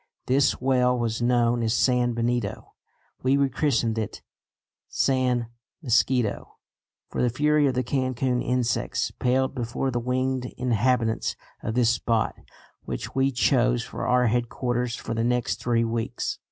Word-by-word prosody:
This 135 +2 +2
well 125 -1 +2
was 115 -1 -2
known 120 0 +2
as 115 0 +1
San 125 0 +2
Benito. 120 -3 -2 0.5
We 130 +2 +3
rechristened 135 -4 +1
it 110 - -5 0.7
San 125 -3 +1 0.3
Mosquito, 120 -3 +1 0.5
for - - -2
the 125 - +3
fury 150 +4 +2
of 130 - 0
the 125 - +1
Cancun 130 -1 0
insects 125 -1 -1
paled 130 +2 0
before 130 +1 -2
the 120 - -1
winged 130 +1 -1
inhabitants 120 -1 +1 0.3
of 110 - -3
this 120 -2 +4
spot 115 -1 0 0.5
which - - -6
we 135 +1 +2
chose 125 -1 +2
for - - -5
our 125 0 +3
headquarters 120 +1 -1
for 115 - -5
the 115 0 -1
next 125 0 0
three 120 -1 +1
weeks. 115 0 -3
125 Hz, 140 wpm, -25 LUFS, 115-130 Hz, 0.7 s, this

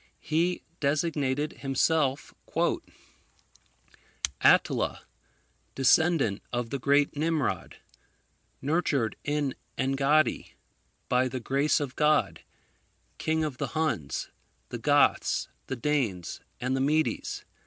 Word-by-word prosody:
He 170 +3 0 0.2
designated 145 -1 0
himself 140 +1 +1 2.1
"ATTILA, - - +3 0.7
Descendant 135 - +3
of 120 -2 -2
the 140 - -2
Great 140 +3 +2
Nimrod. 155 -2 -1 0.9
Nurtured 145 -6 +1
in 145 -2 -1 0.2
Engaddi. 135 +3 +1 0.5
By 125 +1 +2
the 130 0 -4
Grace 140 +5 +1
of 140 -3 -4
God, 150 0 +2 0.8
King 160 0 0
of 145 -5 -4
the - - -3
Huns, 90 - -1 0.4
the - - -5
Goths, - - +2 0.2
the 130 - -3
Danes, 115 - -1 0.2
and 125 +2 -1
the 135 - 0
Medes. 155 +3 0
140 Hz, 95 wpm, -28 LUFS, 130-155 Hz, 2.1 s, ATTILA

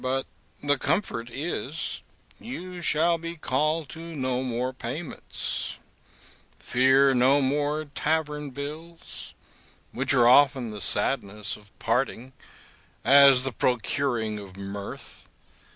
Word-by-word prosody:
But 130 +1 0 0.4
the 145 -1 +2
comfort 120 - -1
is, 150 +2 -4 0.4
you 185 -7 -7
shall 165 +1 +3
be 170 +1 -6
called 155 +2 0
to 160 - -9 0.2
no 130 -2 -1
more 125 0 -2
payments, 135 +6 -5 0.8
fear 130 +2 +4
no 130 +3 +4
more 145 +3 0
tavern 150 0 -2
bills, 140 - -8 0.6
which - - 0
are 120 -1 +5
often 130 -2 +5
the 105 -1 -7
sadness 105 -2 0
of 105 -1 -19
parting, 125 +2 -1 0.7
as 135 0 +7
the 135 - -1
procuring 120 -2 0
of 95 -2 -11
mirth. 100 0 -8
135 Hz, 110 wpm, -26 LUFS, 120-150 Hz, 0.8 s, as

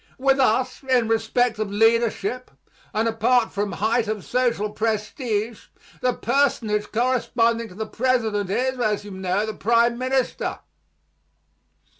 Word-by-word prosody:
With 270 +1 +2
us, 255 0 +1
in 255 -4 +2
respect 225 +1 +1
of 215 -2 -2
leadership, 230 +2 +1 0.4
and 220 +2 0
apart 230 +1 +2
from 205 0 -2
height 225 +2 0
of 215 -3 -3
social 235 -4 0
prestige, 220 +1 -2 0.3
the 250 - +2
personage 220 -7 0
corresponding 230 -1 +1
to 180 - -14
the 220 +2 -4
president 220 -4 0
is, 255 +5 -1
as 210 -3 0
you 205 - -9
know, 190 +2 -1
the 220 - -4
prime 235 +3 +2
minister. 260 0 -1
225 Hz, 130 wpm, -23 LUFS, 210-250 Hz, 0.4 s, With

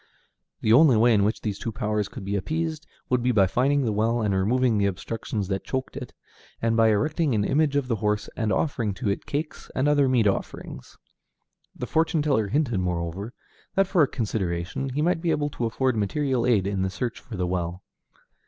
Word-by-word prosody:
The 110 - +3
only 135 -2 +6
way 115 +2 +5
in 100 -2 +3
which 105 +3 0
these 105 -3 -3
two 115 - -3
powers 105 -1 -1
could - - -9
be 100 +1 -2
appeased 160 - -2 0.2
would 125 -1 +2
be 125 +1 +2
by 100 -5 +4
finding 135 +7 +1
the 110 - +1
well, 110 +3 +1
and 105 -2 +1
removing 110 +4 +2
the 100 - +3
obstructions 100 +1 -4
that 95 -1 -2
choked 130 0 -4
it, - - -6 0.5
and 115 0 +1
by 115 -1 +5
erecting 150 +5 +1
an 105 - +1
image 145 +2 +2
of 140 -3 +1
the 115 -3 0
horse 105 0 -1
and 110 -2 -1
offering 115 -9 0
to 105 +1 -2
it 100 - -3
cakes 150 +2 -4
and 130 +2 +1
other 145 -2 +4
meat 125 -4 +3
offerings. 100 - -3 0.8
The - - -4
fortune 160 -1 +1
teller 135 -8 +1
hinted, 120 -2 0
moreover, 90 +4 -3 0.4
that 195 - +4
for 185 -2 +2
a 145 - +5
consideration 100 +1 -2
he 145 +4 -1
might 170 -1 +1
be 170 - 0
able 150 -2 0
to 120 - -3
afford 130 +2 0
material 125 +4 0
aid 105 -6 +3
in 100 -1 -1
the 95 - 0
search 120 +4 -4
for 110 - -9
the 90 - 0
well. 90 0 -3
115 Hz, 210 wpm, -25 LUFS, 100-140 Hz, 0.8 s, only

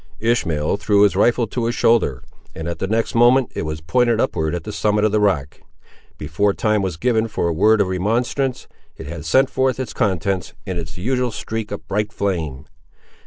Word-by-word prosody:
Ishmael 85 -9 0
threw 105 0 +3
his 100 -2 +3
rifle 120 +4 +3
to 115 +2 -3
his 120 - -1
shoulder, 110 - +2 0.3
and 80 +1 -5
at 85 - -4
the 95 - -2
next 110 +2 0
moment 120 +2 +4
it 75 - -3
was 75 0 -5
pointed 120 +7 +1
upward 80 -11 0
at 85 - -5
the 105 - -6
summit 105 0 +1
of 110 - +2
the 105 - +2
rock. 80 -9 0 0.6
Before 100 -1 0
time 105 -2 +1
was 95 -5 -3
given 115 +1 +1
for 105 - -2
a 85 - 0
word 105 +6 +4
of 100 - +2
remonstrance, 120 +8 -1 0.3
it - - -8
had 80 0 -7
sent 130 +11 +3
forth 130 -1 0
its 130 - -4
contents, 95 -4 -1
in 95 -3 -3
its 80 0 -7
usual 125 +6 0
streak 110 0 -5
of 100 - -7
bright 105 +1 -1
flame. 80 -11 -3
105 Hz, 200 wpm, -20 LUFS, 85-115 Hz, 0.6 s, moment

